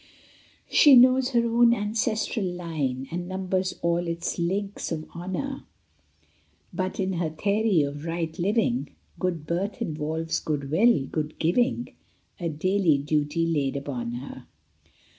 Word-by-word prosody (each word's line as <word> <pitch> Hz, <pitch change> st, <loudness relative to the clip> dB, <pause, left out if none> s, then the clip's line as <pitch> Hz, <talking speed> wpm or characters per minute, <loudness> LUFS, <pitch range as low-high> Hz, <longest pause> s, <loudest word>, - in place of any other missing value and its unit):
She 290 Hz, -3 st, +7 dB
knows 255 Hz, +1 st, +6 dB
her 235 Hz, -3 st, +2 dB
own 235 Hz, 0 st, +4 dB
ancestral 215 Hz, 0 st, -1 dB
line, 155 Hz, -7 st, -3 dB
And 175 Hz, +1 st, -4 dB
numbers 185 Hz, 0 st, -1 dB
all 170 Hz, 0 st, +1 dB
its 170 Hz, +1 st, -3 dB
links 195 Hz, +4 st, -2 dB
of 155 Hz, -1 st, -3 dB
honor; 190 Hz, +11 st, -4 dB, 1.1 s
But 185 Hz, +1 st, -3 dB
in 190 Hz, 0 st, 0 dB
her 170 Hz, -2 st, -1 dB
theory 200 Hz, +1 st, +1 dB
of 145 Hz, +1 st, -5 dB
right 165 Hz, -1 st, -3 dB
living 225 Hz, +7 st, 0 dB, 0.2 s
Good 175 Hz, -4 st, -2 dB
birth 185 Hz, +6 st, -2 dB
involves 160 Hz, +1 st, -2 dB
good 140 Hz, -3 st, -3 dB
will, 170 Hz, -, +4 dB
good 155 Hz, +1 st, -4 dB
giving, 240 Hz, +9 st, +1 dB, 0.5 s
A 170 Hz, -2 st, -2 dB
daily 175 Hz, 0 st, +2 dB
duty 150 Hz, +3 st, 0 dB
laid 145 Hz, -5 st, 0 dB
upon 125 Hz, -4 st, -4 dB
her. 125 Hz, +1 st, -8 dB
175 Hz, 130 wpm, -26 LUFS, 155-205 Hz, 1.1 s, She